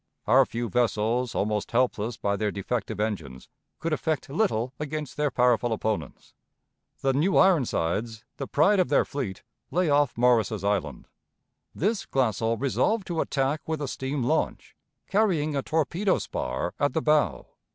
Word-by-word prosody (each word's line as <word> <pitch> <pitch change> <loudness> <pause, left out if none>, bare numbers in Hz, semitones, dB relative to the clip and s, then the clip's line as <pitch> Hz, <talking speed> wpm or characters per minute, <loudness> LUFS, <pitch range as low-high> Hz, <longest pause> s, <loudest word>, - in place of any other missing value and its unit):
Our 135 0 +5
few 120 0 -3
vessels, 120 +2 0
almost 105 0 -1
helpless 120 -2 0
by 100 0 0
their 105 +1 -1
defective 105 +1 -3
engines, 80 -13 -3 0.3
could 165 0 -2
effect 155 -3 -2
little 135 - 0
against 150 -2 -4
their 150 0 +1
powerful 125 -2 +2
opponents. 110 - -3 0.7
The 135 0 +2
New 160 +8 +2
Ironsides, 115 - +2
the 135 - -4
pride 190 +7 +3
of 185 - +2
their - - +3
fleet, 125 -11 -5 0.3
lay 180 -3 +1
off 145 -4 +2
Morris's 115 -4 +2
Island. 95 -9 -1 0.7
This 205 +4 -1
Glassell 115 -3 0
resolved 190 - +1
to 165 -2 0
attack 140 +2 -1
with 160 -1 -2
a 145 - -3
steam 135 +1 -3
launch 120 - -1 0.3
carrying 175 -8 +1
a 140 - +1
torpedo 170 +7 0
spar 65 +7 -3
at 145 - +1
the 160 - 0
bow. 150 -1 +2
130 Hz, 150 wpm, -26 LUFS, 110-155 Hz, 0.7 s, Our